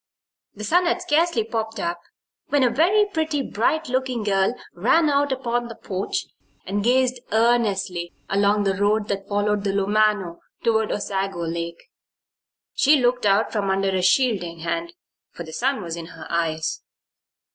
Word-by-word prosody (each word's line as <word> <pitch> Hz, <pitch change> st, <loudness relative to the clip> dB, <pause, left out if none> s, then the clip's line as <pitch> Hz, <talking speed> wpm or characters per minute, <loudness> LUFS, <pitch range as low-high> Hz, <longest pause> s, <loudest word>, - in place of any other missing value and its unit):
The 210 Hz, -, -8 dB
sun 350 Hz, -, +3 dB
had 360 Hz, -, +1 dB
scarcely 330 Hz, -6 st, +2 dB
popped 225 Hz, -1 st, -4 dB
up 170 Hz, -1 st, -2 dB, 0.5 s
when 285 Hz, -2 st, +2 dB
a 245 Hz, -, +3 dB
very 360 Hz, -, +4 dB
pretty, 315 Hz, -7 st, -1 dB
bright 315 Hz, +10 st, 0 dB
looking 255 Hz, -2 st, -1 dB
girl 195 Hz, +2 st, +1 dB, 0.2 s
ran 290 Hz, -, +3 dB
out 285 Hz, 0 st, +2 dB
upon 240 Hz, -2 st, -1 dB
the 230 Hz, -, -9 dB
porch 195 Hz, -1 st, -3 dB, 0.4 s
and 200 Hz, +2 st, -2 dB
gazed 255 Hz, +1 st, +2 dB
earnestly 200 Hz, -6 st, +1 dB, 0.2 s
along 200 Hz, +1 st, +2 dB
the 195 Hz, -1 st, +1 dB
road 205 Hz, +2 st, +1 dB
that 195 Hz, -1 st, -3 dB
followed 205 Hz, 0 st, 0 dB
the 195 Hz, -1 st, 0 dB
Lumano 200 Hz, -3 st, +1 dB, 0.2 s
toward 220 Hz, -2 st, +2 dB
Osago 195 Hz, -3 st, -2 dB
Lake. 170 Hz, 0 st, -5 dB, 0.8 s
She 290 Hz, +1 st, +4 dB
looked 245 Hz, -3 st, +2 dB
out 200 Hz, +3 st, +3 dB
from 205 Hz, -3 st, -1 dB
under 195 Hz, 0 st, +1 dB
a 190 Hz, -1 st, 0 dB
shielding 185 Hz, -6 st, +1 dB
hand, 335 Hz, -, -3 dB, 0.4 s
for 170 Hz, -, -7 dB
the 160 Hz, -1 st, -10 dB
sun 260 Hz, -, 0 dB
was 170 Hz, -1 st, -4 dB
in 165 Hz, -1 st, -7 dB
her 165 Hz, -1 st, -11 dB
eyes. 160 Hz, -2 st, -1 dB
210 Hz, 155 wpm, -23 LUFS, 195-255 Hz, 0.8 s, very